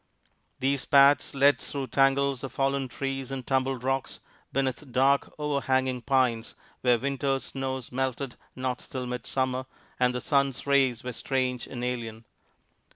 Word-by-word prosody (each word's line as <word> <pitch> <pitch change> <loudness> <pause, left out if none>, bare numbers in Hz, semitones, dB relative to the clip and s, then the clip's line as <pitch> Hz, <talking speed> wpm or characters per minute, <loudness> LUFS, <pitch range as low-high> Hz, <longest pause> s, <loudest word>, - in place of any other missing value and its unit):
These 135 0 0
paths 140 -1 +5
led 140 +1 +5
through 140 -2 -3
tangles 135 0 +2
of 135 - -4
fallen 135 0 0
trees 135 +1 -4
and 135 -2 -5
tumbled 130 -2 0
rocks, 135 0 -1 0.3
beneath 135 +1 -2
dark, 135 +3 +3
overhanging 130 -4 0
pines 120 -3 +1 0.2
where 125 -1 +4
winter's 135 +1 -1
snows 130 -2 -4
melted 130 0 -2 0.2
not 130 -1 -2
till 130 -1 -6
midsummer, 130 +1 -2 0.3
and 125 0 +2
the - - 0
sun's 140 -2 +1
rays 135 -4 +2
were 125 0 -4
strange 130 0 -1
and 125 -2 -6
alien. 115 -2 -4
130 Hz, 140 wpm, -27 LUFS, 125-135 Hz, 0.3 s, paths